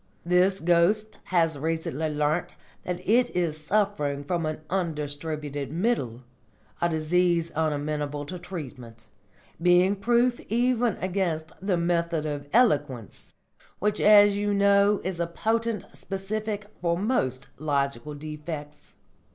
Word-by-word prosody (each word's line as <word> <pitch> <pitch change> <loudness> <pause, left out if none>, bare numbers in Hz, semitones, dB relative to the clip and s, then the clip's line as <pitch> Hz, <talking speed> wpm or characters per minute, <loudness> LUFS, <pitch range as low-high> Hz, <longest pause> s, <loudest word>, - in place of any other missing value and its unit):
This 180 +2 +3
ghost 175 +6 +2
has 165 -5 +1
recently 160 -1 -2
learnt 150 +3 -1 0.3
that 180 0 -4
it 245 +4 +4
is 160 -3 -1
suffering 190 -9 0
from 165 +2 -1
an 155 0 -4
Undistributed 150 -4 -3
Middle, 155 - -1 0.6
a 170 - +3
disease 170 +1 +1
unamenable 150 -2 -2
to 180 +4 -7
treatment, 125 - -9 0.5
being 180 +3 +4
proof 240 +4 +2
even 240 0 +2
against 175 -4 -1
the 190 -2 +1
Method 170 -2 0
of 145 -1 -4
Eloquence, 145 - +1 0.5
which 210 +1 0
as 205 -1 +7
you 205 0 0
know 200 +1 +4
is 185 -1 -3
a 170 - 0
potent 225 +3 -1
specific 205 +2 -4 0.2
for 170 -1 +1
most 135 - -1
logical 140 -1 -1
defects. 150 0 -8
170 Hz, 120 wpm, -26 LUFS, 150-200 Hz, 0.6 s, as